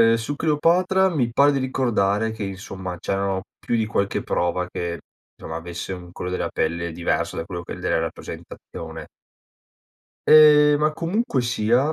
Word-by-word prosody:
ehm, 115 0 +6
su 115 +6 -3
Cleopatra 180 +5 +3
mi 130 -9 0
pare 140 +4 +5
di 140 - 0
ricordare 115 -5 +1
che 110 -1 -5
insomma 95 -1 -6
c'erano 95 +1 -1 0.2
più 120 - -1
di 110 - +1
qualche 100 -2 -1
prova 90 +1 -1
che 85 -1 -4 0.4
somma, 80 - -6
avesse 85 +2 -6
un 90 -1 -9
colore 90 +1 -4
della - - -1
pelle 85 +1 -2
diverso 85 +1 -1
da 80 - -3
quello 85 0 -6
che - - -7
è - - -10
della - - 0
rappresentazione. - - -7 1.2
Ehm, 150 -1 +8
ma 155 +1 +2
comunque 170 - -1
sia 120 +4 +1
110 Hz, 160 wpm, -23 LUFS, 90-145 Hz, 1.2 s, Ehm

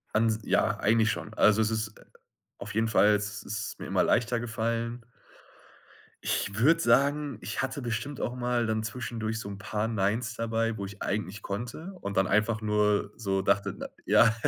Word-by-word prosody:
Ans 110 0 +2
ja, - - +2
eigentlich 110 0 +3
schon. 105 +1 -5
Also, 110 0 +4
es 110 0 +1
ist 110 -1 -2
äh, - - -18 0.5
auf - - -6
jeden 110 +1 +2
Fall 105 -1 +5
es 105 +1 -3
ist 105 0 -4
mir - - -6
immer - - +2
leichter 120 0 +2
gefallen. 115 +1 -2 1.2
Ich 100 - +2
würde 155 +9 +5
sagen, 140 -1 +2
ich - - -2
hatte 135 +1 -3
bestimmt 120 +4 -3
auch 120 - -2
mal 125 -1 0
dann 110 -1 0
zwischendurch 115 -1 -3
so 100 - -6
'n 100 - -6
paar 105 +2 -2
Neins 115 +3 0
dabei, 115 -1 -1
wo 100 - -4
ich 100 +1 -10
eigentlich 100 0 -2
konnte, 120 - -5
und 100 0 -5
dann 95 -1 +3
einfach 110 +2 +2
nur 105 -1 +1
so 95 -3 0
dachte 100 0 +1
na - - -6 0.2
ja, 115 -1 +5
110 Hz, 180 wpm, -28 LUFS, 105-115 Hz, 1.2 s, Fall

